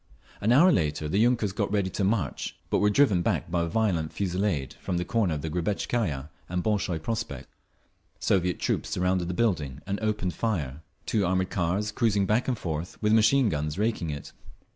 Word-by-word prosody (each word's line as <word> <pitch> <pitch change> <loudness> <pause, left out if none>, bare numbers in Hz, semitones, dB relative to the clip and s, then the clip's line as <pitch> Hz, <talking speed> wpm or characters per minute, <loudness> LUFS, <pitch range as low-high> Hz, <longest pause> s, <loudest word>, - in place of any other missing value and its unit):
An 110 - +2
hour 165 +9 +7
later 75 - 0
the 95 +7 +1
yunkers 120 -4 +2
got 100 -1 -1
ready 100 -3 0
to 100 - -2
march, 100 0 -1
but - - +3
were 105 - +4
driven 105 -6 +4
back 85 - -1
by 85 -1 +1
a 85 - 0
violent 85 -5 0
fusillade 90 -7 -1
from 90 - -2
the 90 - -1
corner 95 -4 +1
of 75 - -5
the 80 - -2
Grebetskaya 85 - -1 0.2
and 90 0 -1
the - - -2
Bolshoy 100 -5 0
Prospekt. 80 - -4 0.7
Soviet 90 -2 +1
troops - - -1
surrounded 90 -1 0
the 90 - -3
building 80 - 0
and 100 0 -2
opened 105 -4 -1
fire, 80 - -2 0.2
two 105 - +1
armoured 95 0 0
cars 95 +4 0
cruising 105 -3 +2
back 110 +5 +1
and 125 -3 0
forth 80 -2 -4
with 105 0 +2
machine 115 +4 +5
guns 75 -3 -2
raking 105 -5 0
it. 70 -1 -6
95 Hz, 190 wpm, -27 LUFS, 85-110 Hz, 0.7 s, hour